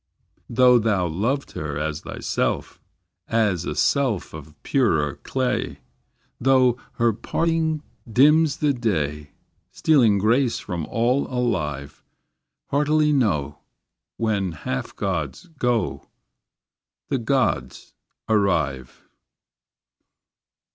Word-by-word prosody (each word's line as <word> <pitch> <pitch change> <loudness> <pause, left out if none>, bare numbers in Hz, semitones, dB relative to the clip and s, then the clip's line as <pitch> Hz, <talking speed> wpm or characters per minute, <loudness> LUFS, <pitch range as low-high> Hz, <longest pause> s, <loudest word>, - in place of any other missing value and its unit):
Though 125 0 +5
thou 105 -5 +1
loved 110 - -1
her 75 -2 -4
as 75 0 -3
thyself, - - -3 0.5
As 105 -6 +1
a - - -3
self 130 -9 +1
of 80 -1 -10
purer 80 - +1
clay, 130 -1 -2 0.6
Though 130 -1 +4 0.2
her 115 -2 +2
parting 160 +6 -1 0.3
dims 150 +5 +4
the 150 -2 +2
day, 75 - -2 0.4
Stealing 115 0 +3
grace 115 +5 +2
from 85 -4 -5
all 120 +4 +1
alive; 75 - -2 0.7
Heartily 150 +1 +2
know, 75 - 0 0.6
When 100 -6 0
half 65 -4 -5
gods 95 - -3
go. 120 -2 -1 1.0
The 135 - 0
gods 130 +3 -1 0.3
arrive. 80 - 0
115 Hz, 95 wpm, -23 LUFS, 80-135 Hz, 1.0 s, Though